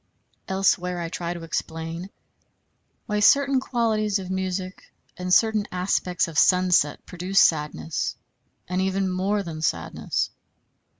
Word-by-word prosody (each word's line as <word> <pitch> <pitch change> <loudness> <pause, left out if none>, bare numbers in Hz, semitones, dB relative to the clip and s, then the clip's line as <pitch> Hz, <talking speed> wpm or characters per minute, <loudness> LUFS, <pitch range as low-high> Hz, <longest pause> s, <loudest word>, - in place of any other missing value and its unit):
Elsewhere 180 -2 +1
I 170 -1 -3
try 170 0 -4
to 170 - -8
explain 165 +2 -4 1.0
why 210 -2 -1
certain 275 +5 +5
qualities 220 -5 0
of 190 -1 -6
music, 185 0 -3 0.3
and 180 0 -4
certain 215 +1 +3
aspects 180 -1 0
of 160 -2 0
sunset 180 -5 +3
produce 180 +2 0
sadness, 150 - +1 0.5
and 180 +1 -1
even 190 0 0
more 195 +3 0
than 160 -3 -6
sadness. 160 - -1
185 Hz, 120 wpm, -24 LUFS, 170-200 Hz, 1.0 s, certain